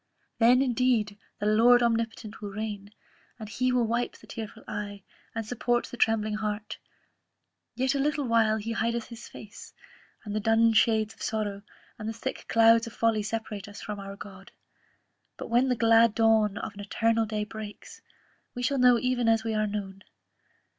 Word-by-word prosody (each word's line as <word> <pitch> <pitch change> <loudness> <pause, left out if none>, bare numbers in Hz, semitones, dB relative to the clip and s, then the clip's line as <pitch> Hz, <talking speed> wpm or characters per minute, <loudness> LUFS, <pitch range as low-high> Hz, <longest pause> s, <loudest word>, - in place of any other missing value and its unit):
Then, 245 +3 +5
indeed, 235 -5 +1 0.2
the 205 - -3
Lord 235 +3 +5
Omnipotent 225 -2 -2
will 205 - -5
reign, 205 -1 -5 0.5
and 220 -2 -8
He 255 +5 0
will 250 -2 +2
wipe 235 +2 -2
the - - -17
tearful 220 -3 -8
eye, 205 -1 -6 0.3
and 225 -1 -3
support 240 +1 0
the - - -9
trembling 220 -2 +1
heart 210 0 -4 1.0
yet 260 +2 +1
a 280 - -1
little 290 0 0
while 225 -2 +3
He 220 +1 -4
hideth 230 +1 -2
his 235 -1 -10
face, 210 +1 -12 0.5
and 205 0 -4
the - - +1
dun 225 +2 +3
shades 220 -1 +3
of - - -20
sorrow, 205 -2 -2 0.4
and 215 0 -4
the - - -3
thick 225 - -6
clouds 230 0 +5
of 230 - -9
folly 225 -2 +1
separate 215 -2 -5
us 205 - -10
from 210 -1 -6
our 195 0 -7
God; 195 -1 -12 0.9
but - - -8
when 245 +3 +3
the 250 - +2
glad 230 -1 +4
dawn 220 -3 +3
of 215 - -5
an 205 - -13
eternal 225 +2 0
day 210 0 -2
breaks, 210 0 -9 0.5
we 245 - -4
shall 275 +2 +1
know 250 -1 +6
even 245 -1 +1
as 225 -1 +3
we 225 -1 -2
are 215 0 +1
known. 200 -2 -5
225 Hz, 180 wpm, -27 LUFS, 210-235 Hz, 1.0 s, know